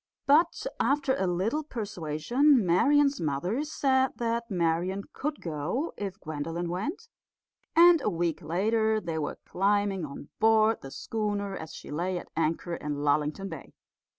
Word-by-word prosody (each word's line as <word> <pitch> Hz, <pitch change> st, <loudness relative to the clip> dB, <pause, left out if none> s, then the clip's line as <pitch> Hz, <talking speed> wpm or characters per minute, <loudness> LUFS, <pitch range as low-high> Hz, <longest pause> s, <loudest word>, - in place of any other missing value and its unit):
But 320 Hz, -, +3 dB
after 280 Hz, -2 st, +2 dB
a 190 Hz, -, 0 dB
little 200 Hz, -, 0 dB
persuasion 220 Hz, -, +1 dB
Marian's 280 Hz, +10 st, +3 dB
mother 170 Hz, -, -1 dB
said 265 Hz, -3 st, +1 dB
that 235 Hz, 0 st, -2 dB
Marian 180 Hz, +1 st, 0 dB
could 295 Hz, +1 st, -3 dB
go 170 Hz, -, -3 dB
if 200 Hz, 0 st, -5 dB
Gwendolen 165 Hz, +2 st, -4 dB
went; 285 Hz, -, -4 dB, 0.7 s
and 340 Hz, -1 st, +7 dB
a -, -, +1 dB
week 170 Hz, -2 st, -1 dB
later 220 Hz, +5 st, +1 dB
they 165 Hz, -5 st, -3 dB
were 150 Hz, -, -3 dB
climbing 200 Hz, -1 st, +1 dB
on 145 Hz, -1 st, -8 dB
board 220 Hz, 0 st, +4 dB
the 135 Hz, -, -8 dB
schooner 205 Hz, +3 st, -3 dB
as 160 Hz, -3 st, -8 dB
she -, -, -10 dB
lay 180 Hz, +4 st, -1 dB
at -, -, -8 dB
anchor 165 Hz, +2 st, -1 dB
in 150 Hz, -3 st, -3 dB
Lullington 150 Hz, +6 st, +1 dB
Bay. -, -, -9 dB
200 Hz, 145 wpm, -28 LUFS, 165-250 Hz, 0.7 s, and